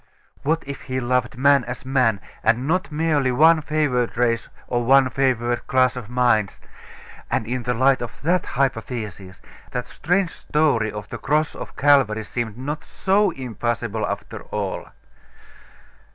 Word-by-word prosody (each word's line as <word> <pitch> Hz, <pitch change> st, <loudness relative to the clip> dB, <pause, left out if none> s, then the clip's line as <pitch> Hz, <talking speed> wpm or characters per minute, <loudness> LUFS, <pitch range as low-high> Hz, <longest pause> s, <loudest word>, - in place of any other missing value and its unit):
What 160 Hz, +3 st, 0 dB
if 140 Hz, -1 st, -6 dB
He 130 Hz, 0 st, -3 dB
loved 125 Hz, 0 st, 0 dB
man 140 Hz, 0 st, +4 dB
as 125 Hz, +1 st, -6 dB
man, 125 Hz, -6 st, +2 dB, 0.2 s
and 115 Hz, +4 st, +1 dB
not 185 Hz, +2 st, 0 dB
merely 150 Hz, -4 st, +1 dB
one 160 Hz, +5 st, +5 dB
favoured 145 Hz, -7 st, 0 dB
race 115 Hz, -1 st, +1 dB, 0.2 s
or 120 Hz, -1 st, 0 dB
one 135 Hz, +1 st, +5 dB
favoured 120 Hz, -3 st, 0 dB
class 130 Hz, -1 st, +3 dB
of 120 Hz, -4 st, -7 dB
minds?.... 120 Hz, -5 st, +1 dB, 0.7 s
And -, -, 0 dB
in 125 Hz, +2 st, -2 dB
the 125 Hz, +1 st, -1 dB
light 130 Hz, +2 st, +3 dB
of 120 Hz, -3 st, -6 dB
that 175 Hz, +3 st, +1 dB
hypothesis, 110 Hz, -7 st, -3 dB, 0.3 s
that 125 Hz, -1 st, -3 dB
strange 180 Hz, +5 st, 0 dB
story 140 Hz, -9 st, +1 dB
of 105 Hz, 0 st, -8 dB
the -, -, -6 dB
Cross 150 Hz, +2 st, +1 dB
of -, -, -9 dB
Calvary 130 Hz, -7 st, +3 dB
seemed 115 Hz, 0 st, -4 dB
not 145 Hz, +4 st, -4 dB
so 200 Hz, +1 st, +1 dB
impossible 120 Hz, -, -3 dB
after -, -, -5 dB
all.... -, -, -4 dB
125 Hz, 150 wpm, -22 LUFS, 120-145 Hz, 0.7 s, one